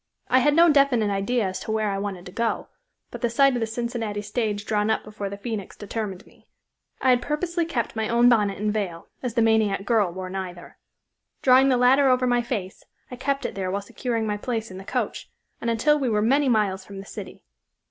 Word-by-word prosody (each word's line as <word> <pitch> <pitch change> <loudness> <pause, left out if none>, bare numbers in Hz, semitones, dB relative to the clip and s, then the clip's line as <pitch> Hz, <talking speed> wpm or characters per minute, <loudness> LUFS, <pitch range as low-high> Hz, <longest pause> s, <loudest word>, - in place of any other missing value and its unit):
I 255 - +5
had 290 +3 +3
no 340 +1 +7
definite 275 -8 +3
idea 200 +4 0
as 185 0 -3
to - - -5
where 215 -1 0
I 195 - -2
wanted 195 -3 -5
to 180 - -9
go, 230 +4 -2 0.4
but - - -8
the 240 - +1
sight 275 +3 +4
of 245 - -1
the 225 - -1
Cincinnati 225 -2 -3
stage 210 -2 -2
drawn 210 0 0
up 220 - +1
before 210 -2 -6
the 200 - -7
Phoenix 210 -2 -5
determined 205 -2 -5
me. - - -23 0.5
I 260 - +3
had 245 -1 +3
purposely 340 +5 -1
kept 240 -10 -2
my 220 -1 -1
own 235 +1 +4
bonnet 210 -5 +3
and 210 +1 -1
veil, 185 -6 -4
as 245 -3 -4
the 230 - +3
maniac 215 -3 +2
girl 215 -6 +2
wore 185 +1 -6
neither. 185 -2 -7 0.6
Drawing 260 +1 +6
the 255 - +3
latter 265 +3 +5
over 255 0 +3
my 245 -1 +2
face, 215 -6 -5 0.3
I - - -5
kept 275 +2 -2
it - - -3
there 190 -2 -3
while 200 +2 -2
securing 230 +1 -3
my 210 -1 -1
place 225 -1 -3
in 185 - -8
the - - -9
coach, - - -3 0.3
and 235 - -1
until 295 +7 +3
we 265 -3 0
were 210 -1 +1
many 275 +4 +3
miles 200 -5 +1
from 200 0 -11
the 195 - -8
city. - - -9
220 Hz, 225 wpm, -24 LUFS, 200-250 Hz, 0.6 s, no